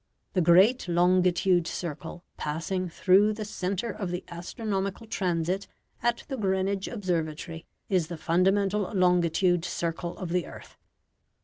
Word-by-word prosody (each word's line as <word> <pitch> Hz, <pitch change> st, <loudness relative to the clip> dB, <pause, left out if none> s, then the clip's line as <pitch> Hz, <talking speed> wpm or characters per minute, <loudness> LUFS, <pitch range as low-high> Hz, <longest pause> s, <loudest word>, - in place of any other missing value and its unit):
The 185 Hz, -, +2 dB
great 185 Hz, +8 st, +5 dB
longitude 180 Hz, 0 st, +3 dB
circle 170 Hz, +1 st, -5 dB
passing 170 Hz, +4 st, -2 dB
through 195 Hz, +5 st, +4 dB
the 215 Hz, 0 st, -5 dB
centre 200 Hz, +2 st, -2 dB
of 195 Hz, -4 st, -4 dB
the 180 Hz, 0 st, -3 dB
astronomical 195 Hz, +4 st, -3 dB
transit 185 Hz, -2 st, -1 dB, 0.3 s
at 240 Hz, 0 st, 0 dB
the 270 Hz, -, -4 dB
Greenwich 190 Hz, -1 st, 0 dB
observatory 165 Hz, -5 st, -3 dB, 0.2 s
is 180 Hz, -5 st, +1 dB
the 170 Hz, 0 st, -6 dB
fundamental 190 Hz, +4 st, +1 dB
longitude 180 Hz, -1 st, +3 dB
circle 170 Hz, 0 st, -3 dB
of 185 Hz, -, -5 dB
the 180 Hz, 0 st, 0 dB
earth. -, -, -12 dB
180 Hz, 125 wpm, -27 LUFS, 170-195 Hz, 0.3 s, great